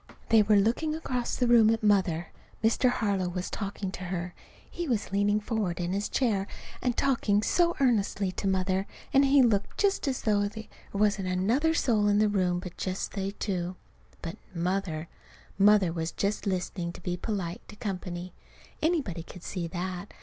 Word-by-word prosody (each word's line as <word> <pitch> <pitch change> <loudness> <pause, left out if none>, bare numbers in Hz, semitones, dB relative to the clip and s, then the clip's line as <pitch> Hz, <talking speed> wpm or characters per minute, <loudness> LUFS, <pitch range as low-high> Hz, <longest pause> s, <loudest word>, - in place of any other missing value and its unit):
They 225 -1 +7
were 210 0 +4
looking 235 +10 +2
across 250 -6 -2
the 250 - +1
room 235 -2 +6
at 225 0 +1
Mother. 185 -5 +2 0.3
Mr. 230 +3 +4
Harlow 200 -6 0
was 180 0 -4
talking 195 -2 -4
to 185 - -6
her. 175 -1 -3 0.3
He 345 -1 -5
was 230 -7 -1
leaning 205 +1 +2
forward 210 -5 -2
in 175 +1 -1
his 200 +2 -1
chair 205 -7 +1 0.3
and 245 -2 0
talking 220 -6 +2
so 345 +5 +2
earnestly 205 -6 +2
to 195 - -3
Mother; 190 +1 +1 0.3
and 275 +1 +6
he 275 0 +6
looked 205 -4 +1
just 395 -6 +1
as 265 -2 0
if - - -18
he 215 - +3
thought 205 0 +2
there 220 0 -8 0.3
wasn't 205 -2 +2
another 230 - +2
soul 215 -9 +2
in 205 0 +3
the 210 0 +4
room 180 -3 +1
but 180 -1 -8
just 185 0 -3
they 195 -1 -2
two. 185 -3 -3 0.5
But 165 - -5 0.2
Mother 170 -2 -1 0.5
Mother 200 -4 +5
was 165 -1 -2
just 205 +1 -2
listening 180 -2 -2
to - - -11
be 175 0 -2
polite 180 -2 -3
to 215 - -11
company. 180 -3 -5 0.5
Anybody 295 - 0
could 175 +1 -12
see 175 -3 -3
that. 180 +3 -5
200 Hz, 180 wpm, -28 LUFS, 180-225 Hz, 0.5 s, They